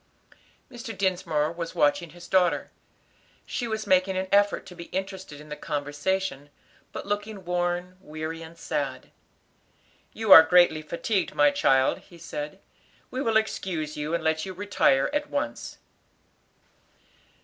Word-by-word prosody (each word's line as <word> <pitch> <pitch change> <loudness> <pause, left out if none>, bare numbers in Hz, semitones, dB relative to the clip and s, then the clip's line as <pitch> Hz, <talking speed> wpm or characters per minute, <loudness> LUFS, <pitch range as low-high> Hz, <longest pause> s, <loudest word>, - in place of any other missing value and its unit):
Mr. 240 -2 -7
Dinsmore 170 -5 0
was 170 0 -6
watching 170 +4 +2
his 175 +2 -13
daughter. 175 -6 +2 0.7
She 240 - -3
was 220 -1 -3
making 190 -1 +3
an 190 0 -1
effort 205 0 +3
to 180 - -11
be 170 0 -8
interested 190 -6 -5
in 150 0 -13
the 150 - -5
conversation, 145 +1 -2 0.4
but - - -6
looking 205 -1 -4
worn, 175 +1 -1
weary, 155 -1 -6
and 165 +1 -11
sad. 135 -5 -4 1.0
"You 220 -2 -2
are 160 - +13
greatly 160 -1 +4
fatigued, 170 +5 -2
my 145 0 +5
child," 130 -1 +3
he 175 - -17
said. 150 +1 -6 0.5
"We 255 - -3
will 225 -4 +3
excuse 170 -8 -2
you 150 +3 -2
and - - -3
let 160 0 +1
you 190 - -5
retire 185 -8 +2
at 295 0 -1
once." 285 +1 -4
175 Hz, 140 wpm, -26 LUFS, 155-195 Hz, 1.0 s, are